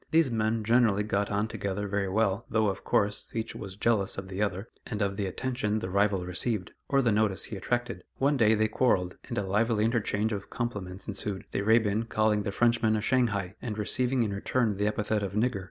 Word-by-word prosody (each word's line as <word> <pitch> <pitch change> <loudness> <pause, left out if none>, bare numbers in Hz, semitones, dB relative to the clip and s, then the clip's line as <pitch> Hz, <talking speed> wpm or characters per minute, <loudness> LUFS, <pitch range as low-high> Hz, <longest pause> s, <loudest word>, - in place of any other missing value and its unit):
These 160 -5 +3
men 110 0 0
generally 110 -2 +3
got 105 -1 0
on 105 +1 0
together 100 -1 -3
very 100 -1 -1
well, 105 +1 0
though, 110 -2 +2
of 95 - -5
course, 105 0 0
each 110 0 -2
was 100 -3 -7
jealous 105 -3 +1
of 95 -1 -6
the 95 +2 -4
other, 100 +1 -1 0.2
and 105 - -4
of 100 -1 0
the 100 -1 -2
attention 110 +1 -1
the 95 -4 -4
rival 100 -2 +2
received, 90 +2 -1 0.2
or 135 -1 +3
the 120 - +3
notice 105 -2 +1
he 110 - -3
attracted. 120 +5 -2
One 140 +2 +2
day 110 -4 +4
they 110 0 +2
quarrelled, 100 -6 +1
and - - -4
a 100 - +1
lively 105 +2 +2
interchange 110 -2 0
of 100 -1 -5
compliments 105 -6 -4
ensued, 100 -1 -3
the - - -1
Arabian 110 +1 +3
calling 110 -2 +1
the 100 - -3
Frenchman 115 0 +2
a 105 - 0
"Shanghai," 105 -6 +1
and 110 -4 -4
receiving 125 +4 +1
in 105 -3 -2
return 105 +1 0
the 105 +1 +1
epithet 105 0 0
of 100 -1 -3
"Nigger." 110 0 +1
105 Hz, 210 wpm, -28 LUFS, 100-115 Hz, 0.2 s, day